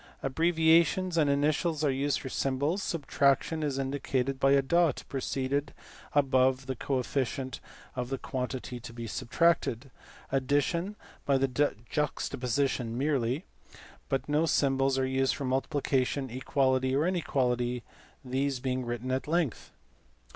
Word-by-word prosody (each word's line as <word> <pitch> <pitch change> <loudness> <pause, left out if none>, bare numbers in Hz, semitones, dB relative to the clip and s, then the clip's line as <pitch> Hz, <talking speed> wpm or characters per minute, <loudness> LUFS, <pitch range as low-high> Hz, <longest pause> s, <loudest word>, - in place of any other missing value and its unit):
Abbrevia 160 +3 +4
tions 185 0 -2
and 155 -3 +3
initials 150 +3 +1
are 145 - +3
used 140 +2 0
for 130 - -6
symbols; 140 +9 0
subtraction 145 -1 +1
is 145 -3 -1
indicated 135 -1 -1
by 135 0 +4
a 140 -1 +4
dot 170 +1 +2
placed 135 0 -3 0.8
above 130 -2 +3
the 130 0 -3
coefficient 130 +1 -2 0.4
of 125 -1 -3
the 135 - -2
quantity 125 -1 -4
to 115 0 -10
be 115 0 -6
subtracted; 130 +1 +1 0.4
addition 145 +8 0 0.3
by 140 -1 +3
juxtaposition 130 -2 -1
merely; 135 +1 0 0.6
but 135 - -1
no 150 +2 +2
symbols 135 -3 +2
are 130 - +2
used 130 0 +1
for 140 - -4
multiplication, 135 0 0
equality, 130 0 +1
or 145 +3 +2
inequality, 125 -9 0 0.4
these 135 +1 -1
being 130 0 -1
written 120 +1 -3
at 130 +2 -1
length. 165 -5 -1
135 Hz, 125 wpm, -29 LUFS, 130-145 Hz, 0.8 s, Abbrevia